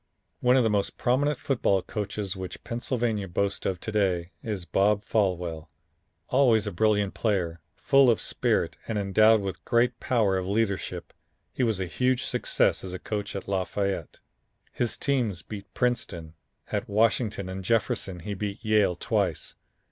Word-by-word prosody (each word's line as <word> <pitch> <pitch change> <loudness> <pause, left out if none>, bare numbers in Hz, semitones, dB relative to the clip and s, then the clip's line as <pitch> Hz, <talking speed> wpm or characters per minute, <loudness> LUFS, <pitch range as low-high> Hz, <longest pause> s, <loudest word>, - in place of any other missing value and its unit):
One 125 +1 +4
of 130 - +4
the 110 - +2
most 100 -1 0
prominent 140 +3 +1
football 100 -9 +1
coaches 105 -2 -3
which 95 -2 -7
Pennsylvania 115 -4 -1
boasts 100 +3 -1
of 95 -2 -2
to 110 - -4
day, 95 -5 0
is 105 -6 -4
Bob 100 +3 +2
Folwell. 90 -6 -1 0.6
Always 120 -5 +4
a 105 - -2
brilliant 105 +1 +2
player, 90 -7 -1
full 135 -2 +4
of 115 - +3
spirit - - 0
and 110 - -2
endowed 110 +2 +4
with 95 -1 -4
a - - -41
great 120 +1 +2
power 110 -7 +2
of 90 - -4
leadership, 100 -1 -1 0.4
he - - -3
was 110 -5 +1
a 95 - -1
huge 125 +7 0
success - - +1
as 95 -1 -6
a - - -3
coach 105 +1 -4
at 100 - -5
Lafayette. 100 0 -2 0.5
His 120 -2 -1
team 130 -6 +1 0.2
beat 100 -2 -8
Princeton. 85 -10 -1 0.4
At - - -2
Washington 105 -1 +1
and 95 +1 -5
Jefferson, 100 -3 0
he 100 +5 -4
beat 100 +3 -5
Yale 105 -4 +3
twice. - - -1
105 Hz, 160 wpm, -27 LUFS, 95-115 Hz, 0.6 s, One